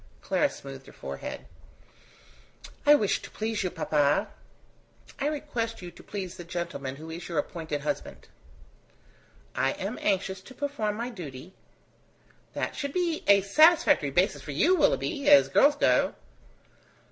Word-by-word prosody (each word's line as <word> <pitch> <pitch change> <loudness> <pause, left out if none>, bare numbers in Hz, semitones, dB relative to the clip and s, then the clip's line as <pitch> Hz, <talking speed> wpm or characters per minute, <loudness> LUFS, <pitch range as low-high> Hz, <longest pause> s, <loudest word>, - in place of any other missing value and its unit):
Clara - - +2
smoothed 135 -1 -10
her - - -12
forehead. 70 0 -7 1.4
"I 295 - +9
wish 210 -8 +1
to - - -10
please 220 -1 -3
you, 185 - -1
papa." 150 -4 +1 0.9
"I 285 - 0
request 240 -8 -3
you 175 - -7
to - - -15
please 190 -4 -6
the 175 - -7
gentleman 170 -6 -5
who 160 +3 -9
is 170 +2 -7
your 170 - -3
appointed 155 -1 -3
husband." 150 - -5 1.3
"I 135 - +1
am 200 +5 -5
anxious 190 -1 0
to 260 - -14
perform 280 -8 -2
my 235 +3 -4
duty." 165 - -9 1.0
"That - - -3
should 280 -1 -4
be 345 -3 -1
a 200 -1 +7
satisfactory 310 - +5
basis - - +1
for - - -7
you, 370 - +4
Willoughby; 295 -2 +1
as 290 -1 +7
girls 290 +1 +5
go!" - - +2
200 Hz, 145 wpm, -27 LUFS, -, 1.4 s, I